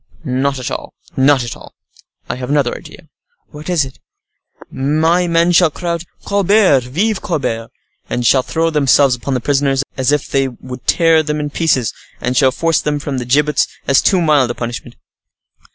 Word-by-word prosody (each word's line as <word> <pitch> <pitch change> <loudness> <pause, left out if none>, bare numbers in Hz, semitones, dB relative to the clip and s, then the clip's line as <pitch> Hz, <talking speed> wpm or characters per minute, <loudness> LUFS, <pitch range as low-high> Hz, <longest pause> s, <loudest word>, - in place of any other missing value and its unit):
"Not 135 +1 -1
at 125 -1 -5
all,—not 135 -1 0
at 120 - -6
all. - - -15 0.5
I - - -3
have 125 0 -6
another 145 -4 +1
idea." - - -13 0.4
"What 150 +3 -9
is 170 -5 +2
that?" 130 -1 -10 0.7
"My 160 +6 +1
men 170 +1 +2
shall 175 -1 +5
cry 170 +3 -4
out, 170 0 -3 0.2
'Colbert, 200 - +3
vive 190 - -1
Colbert!' 115 -9 -3 0.4
and 120 0 -2
shall 130 +3 +4
throw 165 +5 -1
themselves 140 -2 +3
upon 125 +2 -3
the - - 0
prisoners 140 -1 +1
as 130 +1 +1
if 150 -1 0
they 135 -1 +1
would 125 0 -10
tear 165 -2 +4
them 150 -1 -3
in 150 -1 -3
pieces, 140 -8 0 0.3
and 125 +1 -2
shall 130 0 +4
force 165 +3 0
them 150 0 -1
from 145 -2 -4
the 120 - -5
gibbets, 145 +3 +2 0.2
as 140 - +4
too 190 -3 +2
mild 150 -6 +3
a 120 - -3
punishment." 120 -1 -6
145 Hz, 180 wpm, -16 LUFS, 130-165 Hz, 0.7 s, shall